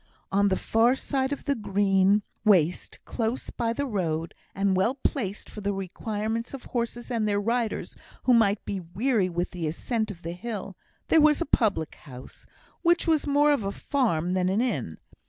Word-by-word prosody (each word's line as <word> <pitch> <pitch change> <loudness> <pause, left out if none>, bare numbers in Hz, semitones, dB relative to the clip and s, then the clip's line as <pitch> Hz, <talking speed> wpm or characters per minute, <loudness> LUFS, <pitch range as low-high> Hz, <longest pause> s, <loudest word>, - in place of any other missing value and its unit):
On 200 +1 +3
the 190 - +2
far 230 +3 +3
side 265 0 -1
of 285 - -4
the 285 - +2
green 200 -2 +2 0.2
waste, 180 -6 +2
close 230 +2 -2
by 230 -2 -1
the 285 +5 -2
road, 165 - -2 0.2
and 195 0 +2
well 225 +8 +2
placed 220 -7 -2
for 210 - -9
the 200 0 -1
requirements 215 +5 -3
of 265 - -10
horses 240 0 -3
or 235 - 0
their 210 -2 +1
riders 230 +2 -1 0.3
who 255 - +4
might 215 -3 +3
be 195 - -3
weary 190 +4 0
with 175 +1 -2
the 175 -3 -3
ascent 220 +7 -2
of 175 -4 -9
the 165 - -4
hill, 200 0 -6 0.3
there 320 - +6
was 300 0 +5
a 340 - 0
public 200 - +1
house, 130 -3 -13 0.3
which 345 0 +3
was 315 -2 +2
more 290 +1 +4
of 280 -7 +1
a 195 - -2
farm 185 - 0
than 185 -1 +1
an 195 +3 +1
inn. 145 - -1
210 Hz, 185 wpm, -27 LUFS, 190-245 Hz, 0.3 s, there